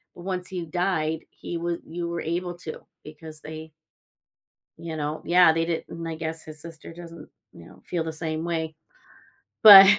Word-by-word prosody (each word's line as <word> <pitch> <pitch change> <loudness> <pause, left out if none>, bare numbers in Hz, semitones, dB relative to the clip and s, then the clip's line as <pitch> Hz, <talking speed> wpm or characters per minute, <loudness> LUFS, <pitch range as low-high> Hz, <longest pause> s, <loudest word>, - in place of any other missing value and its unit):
once 180 0 -3
he 180 -2 -3
died, 160 -2 0
he 175 - -6
was 170 0 -1
you 170 +1 -3
were 170 0 -2
able 175 +2 -2
to 160 -3 -6 0.3
because 155 0 -10
they 155 0 -8 1.1
you 165 -1 -5
know. 150 +1 -2
Yeah, 175 -1 +7
they 165 0 +1
didn't 165 0 -3
I 165 - -3
guess 160 0 -4
his 155 -1 -10
sister 165 0 -10
doesn't, 165 -2 -10 0.2
you 85 - -12
know, - - -16
feel 170 -2 -1
the 160 0 -4
same 160 0 -3
way. 160 -2 -2 0.9
But 195 -2 +14
165 Hz, 170 wpm, -26 LUFS, 160-175 Hz, 1.1 s, But